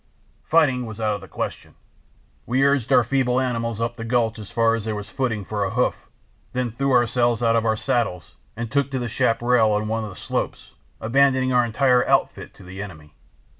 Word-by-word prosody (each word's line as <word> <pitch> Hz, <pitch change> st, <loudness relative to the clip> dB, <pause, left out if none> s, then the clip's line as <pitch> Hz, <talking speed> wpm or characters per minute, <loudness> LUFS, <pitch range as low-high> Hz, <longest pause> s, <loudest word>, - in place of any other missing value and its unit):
Fighting 135 Hz, -7 st, +2 dB
was 110 Hz, 0 st, -8 dB
out 110 Hz, -1 st, +1 dB
of 105 Hz, -, -5 dB
the -, -, -11 dB
question: -, -, -6 dB, 0.7 s
we 130 Hz, +3 st, +2 dB
urged 140 Hz, -3 st, +1 dB
our 125 Hz, -2 st, +6 dB
feeble 125 Hz, +1 st, +1 dB
animals 115 Hz, -3 st, -2 dB
up 120 Hz, +1 st, -2 dB
the 115 Hz, -, -5 dB
gulch 115 Hz, -1 st, 0 dB
as 105 Hz, -, -9 dB
far 115 Hz, -1 st, +2 dB
as 115 Hz, -2 st, -2 dB
there 110 Hz, 0 st, -3 dB
was 105 Hz, -1 st, -7 dB
footing 115 Hz, -6 st, -2 dB
for 105 Hz, 0 st, -2 dB
a 95 Hz, -, -1 dB
hoof, -, -, -1 dB, 0.4 s
then 125 Hz, -2 st, -1 dB
threw 135 Hz, +4 st, -1 dB
ourselves 120 Hz, -1 st, +2 dB
out 115 Hz, 0 st, +3 dB
of 115 Hz, 0 st, +1 dB
our 110 Hz, -1 st, +1 dB
saddles 110 Hz, -7 st, -2 dB, 0.2 s
and 115 Hz, 0 st, -5 dB
took 140 Hz, -1 st, +1 dB
to 135 Hz, -, -3 dB
the 120 Hz, -1 st, -2 dB
chaparral 115 Hz, 0 st, +2 dB
on 105 Hz, +1 st, -1 dB
one 110 Hz, +1 st, -1 dB
of 110 Hz, -, -5 dB
the 90 Hz, -, -11 dB
slopes, -, -, -4 dB, 0.3 s
abandoning 130 Hz, +2 st, +2 dB
our 125 Hz, 0 st, +4 dB
entire 125 Hz, +2 st, +3 dB
outfit -, -, 0 dB
to -, -, -15 dB
the 95 Hz, +2 st, -8 dB
enemy. 80 Hz, -7 st, -10 dB
115 Hz, 205 wpm, -23 LUFS, 110-125 Hz, 0.7 s, our